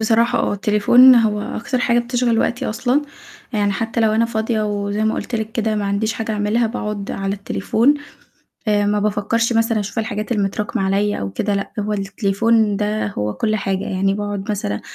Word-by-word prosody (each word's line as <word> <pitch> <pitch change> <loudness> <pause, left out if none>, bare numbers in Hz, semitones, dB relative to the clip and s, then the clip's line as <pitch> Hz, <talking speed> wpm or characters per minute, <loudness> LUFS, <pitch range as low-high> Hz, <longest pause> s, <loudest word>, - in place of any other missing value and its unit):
بصراحة 230 +2 +2
آه، - - 0
التليفون 210 +5 +6
هو 220 -3 +2
أكتر 235 +4 -3
حاجة 240 -1 +2
بتشغِل 240 -1 0
وقتي 245 +3 0
أصلًا، 245 +6 0 0.5
يعني 205 -2 +1
حتى 225 +3 -2
لو 220 -1 +3
أنا 225 +1 +3
فاضية 220 -1 -1
وزي 205 0 -1
ما 220 - +1
قُلت - - -5
لِك 220 -1 -3
كده 220 -1 0
ما 210 -1 -1
عنديش 200 +2 0
حاجة 225 0 -3
أعملها، 210 +3 +1
باقعد 210 -3 -4
على 195 0 -2
التليفون 220 +6 +1 0.7
آآ، 205 -1 +2
ما 205 0 +1
بافكّرش 215 +3 0
مثلًا 225 -1 +2
أشوف 205 +3 -3
الحاجات 215 0 -4
المتراكمة 205 -2 -1
عليَّ 200 +2 0
أو 100 - -3
كده، 205 - -1
لأ، 200 0 -3
هو 210 +1 -1
التليفون 205 +2 +1
ده 210 +1 -1
هو 105 - -3
كُلّ 215 - 0
حاجة، 195 -2 -2
يعني 195 +1 0
باقعد 205 0 -3
مثلًا 105 - -3
215 Hz, 185 wpm, -19 LUFS, 200-230 Hz, 0.7 s, التليفون